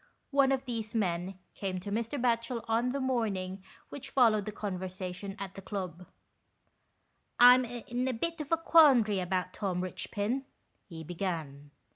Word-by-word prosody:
One 275 -1 +4
of 270 0 0
these 225 -3 -4
men 185 -2 -1 0.2
came 190 -2 -3
to 200 - -6
Mr. 230 +6 -2
Batchel 235 -1 0
on 230 +2 +1
the 275 +2 -2
morning 200 -8 -1 0.3
which 275 -1 -8
followed 225 -7 +4
the 215 - -4
conversation 185 -1 -5
at 195 -1 -6
the 195 - -9
club. 180 -3 -6 1.3
"I'm 250 +1 +8
in 245 +1 -3
a - - +1
bit 330 +7 -2
of 295 - -8
a 330 - +4
quandary 275 - +5
about 185 0 -2
Tom 185 -3 -2
Richpin," 205 +7 -3 0.4
he 165 -2 -8
began. 160 -5 -4
210 Hz, 150 wpm, -30 LUFS, 185-250 Hz, 1.3 s, I'm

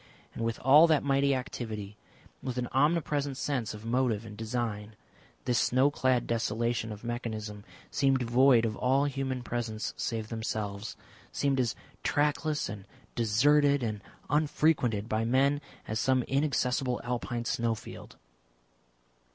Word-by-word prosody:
And 115 - -4
with 115 0 -2
all 150 +5 +8
that 155 -3 +3
mighty 140 0 +2
activity, 110 -5 -5 0.5
with 130 -2 -4
an 125 -1 -1
omnipresent 145 -1 +1
sense 125 -7 -2
of 105 +1 -11
motive 115 -2 0
and 105 -2 -9
design, 110 -2 -3 0.5
this 125 -1 +2
snow 130 +3 +3
clad 130 -4 +1
desolation 115 0 -1
of 105 +1 -8
mechanism 110 -3 -4 0.3
seemed 135 -2 +2
void 120 0 +5
of 110 -1 -2
all 135 +4 +2
human 135 -2 -2
presence 115 -3 -3
save 110 -2 -3
themselves, 110 -2 -4 0.4
seemed 140 -2 0
as 120 -3 0 0.3
trackless 150 +1 0
and 100 -2 -8 0.3
deserted 140 +5 +3
and 105 -3 -3 0.3
unfrequented 145 -7 +1
by 110 0 0
men 135 +5 +2 0.3
as 110 0 -2
some 130 0 +2
inaccessible 135 -2 0
Alpine 120 -1 -3
snowfield. 115 -1 -3
120 Hz, 130 wpm, -29 LUFS, 110-135 Hz, 0.5 s, all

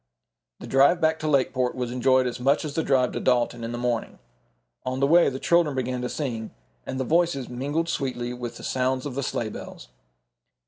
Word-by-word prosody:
The - - -8
drive 140 +6 +4
back 160 0 +2
to 155 - -3
Lakeport 130 -3 +1
was 125 -2 -3
enjoyed 130 +1 +3
as 125 0 -3
much 140 +5 +2
as 150 - -5
the 160 - 0
drive 130 -4 +2
to - - -3
Dalton 120 -1 +1
in 115 - -4
the 120 - -4
morning. 120 -2 -2 0.7
On 130 +1 -3
the 140 - +3
way 170 +4 +5
the 130 - -5
children 165 -1 +2
began 130 -1 -2
to 125 - -3
sing, 115 -7 -3 0.4
and 130 - -3
the - - +1
voices 165 -2 +1
mingled 145 +7 -2
sweetly 125 -6 -2
with 120 -1 -6
the - - -11
sounds 130 0 0
of 145 - -4
the 140 - -2
sleigh 115 -4 -2
bells. 60 - -9
130 Hz, 210 wpm, -25 LUFS, 125-145 Hz, 0.7 s, way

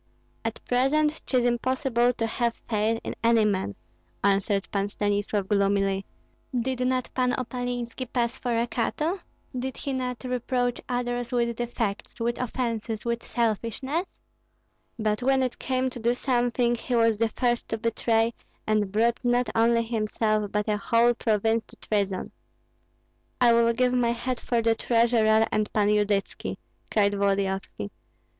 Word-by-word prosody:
"At 225 0 -3
present 295 +5 +2
'tis 250 -2 +2
impossible 245 0 +2
to 225 - -1
have 235 +1 -1
faith 220 +1 +1
in - - -4
any 230 -1 +5
man," 190 - 0 0.5
answered 195 0 +2
Pan 200 0 0
Stanislav, 205 -1 -1
gloomily. 195 -1 +1 0.5
"Did 255 +1 -2
not 255 -1 -1
Pan 250 -1 +1
Opalinski 245 -1 -4
pass 235 -2 0
for 240 -2 -1
a 230 - +2
Cato? 305 +10 -1 0.4
Did 255 +1 -3
he 275 - -3
not 250 -1 -3
reproach 250 -1 -1
others 245 -1 -2
with 235 -1 +1
defects, 230 -3 -3
with 235 +1 -1
offences, 230 -3 -2
with 235 0 -1
selfishness? 240 - -1 0.9
But 215 0 0
when 265 +1 +3
it 250 -1 -3
came 260 0 0
to 245 - -7
do 235 +2 +1
something, 245 -2 +1
he 240 +1 -2
was 230 -2 +3
the 230 -1 +2
first 240 +1 0
to 225 - -1
betray, 230 0 +1 0.3
and 210 -2 +1
brought 230 +3 +2
not 245 0 +2
only 230 +1 +3
himself, 215 -2 0
but 210 +1 -1
a 210 -1 +1
whole 230 +3 +3
province 225 -1 +1
to - - -16
treason." 200 -3 -2 1.1
"I 240 -2 +6
will 230 0 +4
give 250 +1 +2
my 240 -2 +2
head 245 +1 -3
for 235 -2 0
the 230 0 +4
treasurer 225 -1 +3
and 215 -1 0
Pan 210 -1 +3
Yudytski!" 205 -1 0 0.3
cried 205 -2 +3
Volodyovski. 195 - -1
235 Hz, 150 wpm, -26 LUFS, 215-245 Hz, 1.1 s, I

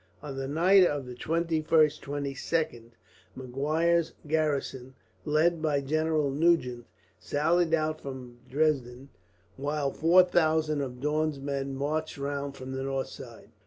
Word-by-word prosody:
On 140 -2 -6
the 135 0 -4
night 180 +7 +5
of 145 -6 0
the 125 - -8
21st 160 +4 -1 0.4
22nd 140 -2 -3 0.5
Maguire's 155 +6 0
garrison, 140 -4 -1 0.3
led 155 +2 +2
by 150 -3 +1
General 155 +1 0
Nugent, 135 -6 +1 0.3
sallied 165 +3 +2
out 155 0 -2
from 125 -3 -8
Dresden; 135 -3 0 0.5
while 145 0 -1
four 175 +5 +5
thousand 155 -4 +1
of 125 -2 -6
Daun's 150 0 0
men 135 -1 -3
marched 155 +3 -2
round 140 0 -4
from 130 0 -7
the 130 0 -3
north 135 0 -2
side. - - -12
145 Hz, 125 wpm, -28 LUFS, 135-160 Hz, 0.5 s, night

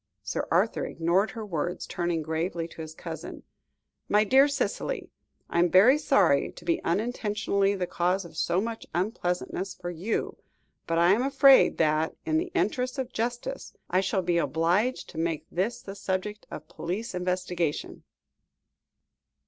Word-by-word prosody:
Sir 105 - -3
Arthur 190 +7 +2
ignored 175 +6 +1
her 225 -3 -6
words, 175 -2 -3
turning 170 -2 -2
gravely 165 +2 -2
to 165 - -9
his 160 0 -8
cousin. - - -7 0.7
"My 210 +1 +5
dear 265 +6 +5
Cicely, 290 - -2 0.4
I - - -1
am 175 0 +4
very 220 - +6
sorry 195 - +3
to 175 - -13
be 170 - 0
unintentionally 205 0 0
the 185 -2 -1
cause 180 +2 0
of 165 -2 -12
so 170 +3 +1
much 225 +2 -4
unpleasantness 185 -1 -2
for 175 -1 -6
you, 180 +7 -3 0.5
but 165 - 0
I 170 +2 +5
am 210 +5 +3
afraid 275 0 +6
that, 155 0 +1
in 315 -1 +2
the 360 +2 -4
interests 255 -8 0
of 260 -1 -4
justice, 240 +4 -4 0.2
I 185 +1 +3
shall 195 0 0
be 170 -1 +2
obliged 175 +10 +1
to 160 - -6
make 165 -2 -1
this 230 +7 -2
the 195 - -7
subject 200 +1 -3
of - - -8
police 195 +8 -4
investigation." 180 -3 -2
185 Hz, 155 wpm, -27 LUFS, 170-225 Hz, 0.7 s, very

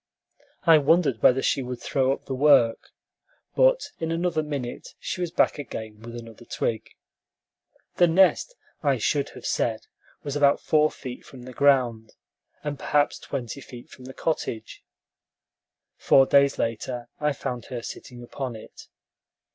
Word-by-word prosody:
I 165 -3 +7
wondered 145 -4 +2
whether 130 +1 +4
she 135 - +1
would 125 -1 -5
throw 130 -1 0
up 135 - -4
the 135 - -4
work, 130 -4 +4 0.7
but - - +3
in 165 - -2
another 170 -1 0
minute 140 -5 -6
she 180 - -5
was 175 - -1
back 165 - +1
again 110 -6 -7
with 115 +1 -9
another 115 -1 -10
twig. 115 -1 -3 1.1
The 175 - +6
nest, 190 - +3 0.3
I 140 -3 +2
should 140 +5 0
have - - -10
said, - - 0 0.4
was 145 -1 -4
about 145 -1 +4
four 155 0 +3
feet 125 -4 -9
from 125 -2 -13
the 130 0 -10
ground, 125 -6 +2 0.5
and 145 -2 -4
perhaps 145 0 +1
twenty 125 +2 -5
feet 120 -2 -12
from 125 - -13
the 130 - -9
cottage. 140 -8 -3 1.1
Four 135 - +5
days 140 0 +4
later, 120 +1 -3
I 150 0 +1
found 125 -3 -5
her 120 -2 -6
sitting 120 0 -9
upon 125 0 -5
it. 110 - -13
135 Hz, 150 wpm, -25 LUFS, 120-150 Hz, 1.1 s, I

